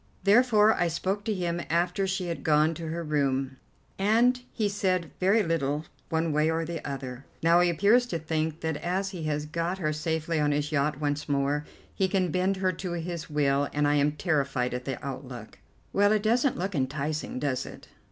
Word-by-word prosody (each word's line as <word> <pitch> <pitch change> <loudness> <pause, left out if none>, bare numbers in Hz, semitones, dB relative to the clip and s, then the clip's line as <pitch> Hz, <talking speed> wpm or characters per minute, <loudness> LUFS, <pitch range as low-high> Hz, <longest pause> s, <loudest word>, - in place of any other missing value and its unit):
Therefore 215 +1 +5
I 175 - +1
spoke 190 +5 -2
to 220 - 0
him 175 -2 -2
after 175 +4 +1
she 190 -1 -1
had 165 -5 -4
gone 155 +1 +3
to 165 0 -6
her 165 +2 -3
room, 135 -3 0 0.4
and 235 +5 +3
he 215 - 0
said 185 -4 -1
very 200 +4 +4
little 155 -3 -1 0.2
one 160 -1 0
way 150 +1 +2
or 165 0 0
the 165 -1 -5
other. 135 -2 -6 0.2
Now 170 +1 +5
he 175 0 +4
appears 210 +8 +4
to 175 - -2
think 160 0 -2
that 160 -2 -1
as 190 +4 -2
he 170 -5 -6
has 150 -1 -1
got 170 +4 -2
her 155 -5 -1
safely 160 +1 -1
on 145 -1 +2
his 145 +1 -1
yacht 150 -1 0
once 145 0 -2
more 145 +1 0 0.3
he 190 - +1
can 185 -3 0
bend 185 +3 +1
her 185 -1 +1
to 180 +1 -5
his 170 -1 -4
will, 145 -1 +1
and 145 0 +2
I 145 - +3
am 145 0 +2
terrified 140 -6 0
at 125 0 -4
the 135 -3 -3
outlook." 130 -3 -7 0.3
"Well, 205 +1 +4
it 215 -1 +2
doesn't 240 +4 +2
look 190 +3 -2
enticing, 140 +1 -2
does 130 -2 -1
it?" - - -11
160 Hz, 200 wpm, -27 LUFS, 145-185 Hz, 0.4 s, Therefore